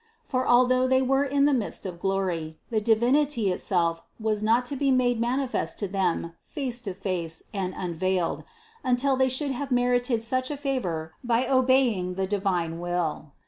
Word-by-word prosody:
For 255 Hz, -, -1 dB
although 255 Hz, +1 st, +4 dB
they 260 Hz, 0 st, +3 dB
were 270 Hz, +2 st, +2 dB
in 280 Hz, 0 st, +2 dB
the 290 Hz, -, +3 dB
midst 235 Hz, -6 st, -2 dB
of 175 Hz, -2 st, -6 dB
glory, 175 Hz, -5 st, -2 dB
the 220 Hz, -2 st, +1 dB
Divinity 235 Hz, 0 st, +2 dB
itself 170 Hz, -2 st, 0 dB, 0.2 s
was 215 Hz, -1 st, -1 dB
not 230 Hz, +3 st, +3 dB
to 280 Hz, -, -3 dB
be 275 Hz, +1 st, +1 dB
made 245 Hz, -3 st, +2 dB
manifest 255 Hz, +2 st, -1 dB
to 205 Hz, -, -2 dB
them 185 Hz, -3 st, -1 dB
face 255 Hz, -4 st, -4 dB
to 195 Hz, -6 st, -5 dB
face 180 Hz, -4 st, -3 dB
and 190 Hz, -2 st, -3 dB
unveiled, 180 Hz, 0 st, -1 dB, 0.4 s
until 260 Hz, +1 st, +2 dB
they 260 Hz, 0 st, +2 dB
should 275 Hz, +2 st, 0 dB
have 265 Hz, +2 st, -4 dB
merited 245 Hz, -2 st, +1 dB
such 255 Hz, +2 st, -1 dB
a 295 Hz, -, -3 dB
favor 180 Hz, -, -2 dB
by 240 Hz, +1 st, +2 dB
obeying 255 Hz, -8 st, +2 dB
the 190 Hz, 0 st, 0 dB
divine 185 Hz, -4 st, -1 dB
will. 175 Hz, -4 st, -2 dB
230 Hz, 170 wpm, -26 LUFS, 185-260 Hz, 0.4 s, although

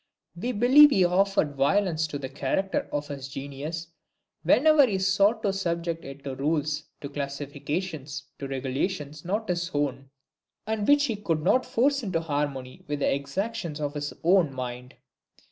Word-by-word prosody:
We 235 Hz, +9 st, -2 dB
believe 255 Hz, +6 st, +7 dB
he 190 Hz, -10 st, +4 dB
offered 185 Hz, -4 st, +2 dB
violence 160 Hz, +3 st, +2 dB
to 145 Hz, -, -4 dB
the 135 Hz, -1 st, -5 dB
character 190 Hz, +9 st, -1 dB
of 145 Hz, 0 st, -3 dB
his 140 Hz, -2 st, -6 dB
genius 140 Hz, +4 st, -5 dB, 0.6 s
whenever 290 Hz, -, +5 dB
he 200 Hz, -4 st, 0 dB
sought 200 Hz, +4 st, +2 dB
to 200 Hz, -, +1 dB
subject 170 Hz, -3 st, -2 dB
it 135 Hz, +1 st, -9 dB
to 135 Hz, -, -4 dB
rules, 150 Hz, +2 st, -1 dB, 0.2 s
to 140 Hz, -, -5 dB
classifications, 145 Hz, +1 st, -4 dB, 0.2 s
to 140 Hz, -, -4 dB
regulations 140 Hz, +3 st, -3 dB
not 210 Hz, +5 st, -2 dB
his 175 Hz, 0 st, -1 dB
own, 135 Hz, -2 st, -1 dB, 0.6 s
and 215 Hz, -1 st, -2 dB
which 290 Hz, 0 st, +5 dB
he 230 Hz, -6 st, -1 dB
could 165 Hz, -7 st, -1 dB
not 255 Hz, +8 st, +3 dB
force 270 Hz, +3 st, +2 dB
into 190 Hz, -7 st, -1 dB
harmony 145 Hz, -5 st, -3 dB
with 145 Hz, 0 st, -2 dB
the 140 Hz, -, +1 dB
exactions 165 Hz, +4 st, -3 dB
of 145 Hz, -1 st, -2 dB
his 145 Hz, -1 st, -3 dB
own 175 Hz, -3 st, +4 dB
mind. 125 Hz, -1 st, -6 dB
155 Hz, 160 wpm, -27 LUFS, 140-195 Hz, 0.6 s, believe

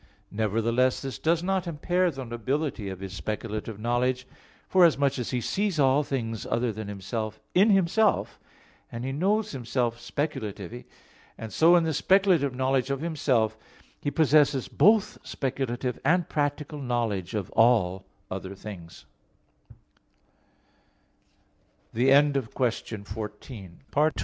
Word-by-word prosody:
Nevertheless 115 Hz, +4 st, +1 dB
this 135 Hz, -1 st, -5 dB
does 165 Hz, +1 st, +1 dB
not 190 Hz, -1 st, 0 dB
impair 175 Hz, +3 st, +1 dB
the 135 Hz, -5 st, -6 dB
nobility 120 Hz, -1 st, -2 dB
of 95 Hz, -1 st, -7 dB
His 95 Hz, -1 st, -6 dB
speculative 110 Hz, +1 st, -5 dB
knowledge, 125 Hz, +3 st, 0 dB, 0.4 s
forasmuch 145 Hz, -7 st, +4 dB
as 120 Hz, -, -3 dB
He 125 Hz, -2 st, -1 dB
sees 195 Hz, -, -1 dB
all 135 Hz, +1 st, +4 dB
things 115 Hz, -6 st, -3 dB
other 120 Hz, 0 st, 0 dB
than 110 Hz, 0 st, -7 dB
Himself 110 Hz, +2 st, -4 dB
in 195 Hz, +5 st, +5 dB
Himself, 195 Hz, +2 st, +2 dB, 0.5 s
and 120 Hz, +1 st, -5 dB
He 135 Hz, -, -2 dB
knows 200 Hz, +9 st, 0 dB
Himself 120 Hz, -2 st, -2 dB
speculatively; 120 Hz, -, -4 dB, 0.5 s
and 110 Hz, -1 st, -8 dB
so 170 Hz, +2 st, +6 dB
in 170 Hz, -, +4 dB
the 160 Hz, -1 st, 0 dB
speculative 175 Hz, -4 st, +3 dB
knowledge 130 Hz, 0 st, +1 dB
of 140 Hz, 0 st, -2 dB
Himself, 135 Hz, -9 st, +1 dB, 0.5 s
he -, -, -1 dB
possesses 150 Hz, -3 st, +3 dB
both 210 Hz, +7 st, +3 dB
speculative 130 Hz, -2 st, -3 dB
and 170 Hz, +3 st, +2 dB
practical 145 Hz, 0 st, -2 dB
knowledge 115 Hz, -6 st, -2 dB
of 100 Hz, -4 st, -3 dB
all 105 Hz, -5 st, +3 dB, 0.3 s
other 95 Hz, +1 st, -5 dB
130 Hz, 110 wpm, -27 LUFS, 115-155 Hz, 0.5 s, so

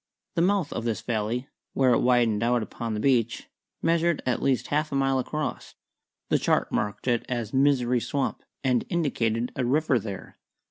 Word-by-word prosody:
The 170 Hz, -, +1 dB
mouth 190 Hz, -3 st, +1 dB
of 115 Hz, -, -3 dB
this 115 Hz, -2 st, -2 dB
valley, 120 Hz, +3 st, -2 dB, 0.3 s
where 130 Hz, -2 st, +4 dB
it -, -, +3 dB
widened 120 Hz, -4 st, +3 dB
out 120 Hz, 0 st, +2 dB
upon 115 Hz, 0 st, -4 dB
the -, -, -2 dB
beach, 120 Hz, -2 st, +1 dB, 0.4 s
measured 170 Hz, 0 st, +2 dB
at 125 Hz, -, 0 dB
least 135 Hz, -2 st, +1 dB
half 150 Hz, +2 st, 0 dB
a -, -, -2 dB
mile 135 Hz, -1 st, +2 dB
across. 150 Hz, +4 st, -4 dB, 0.5 s
The -, -, +3 dB
chart -, -, +1 dB
marked 105 Hz, +4 st, -2 dB
it 120 Hz, -2 st, +2 dB
as 120 Hz, -4 st, -3 dB
Misery 130 Hz, -3 st, +3 dB
Swamp, 140 Hz, +3 st, -2 dB, 0.2 s
and 125 Hz, -3 st, +2 dB
indicated 125 Hz, -, 0 dB
a 130 Hz, -, -1 dB
river 140 Hz, +1 st, +2 dB
there. 100 Hz, -2 st, -8 dB
125 Hz, 175 wpm, -26 LUFS, 115-140 Hz, 0.5 s, where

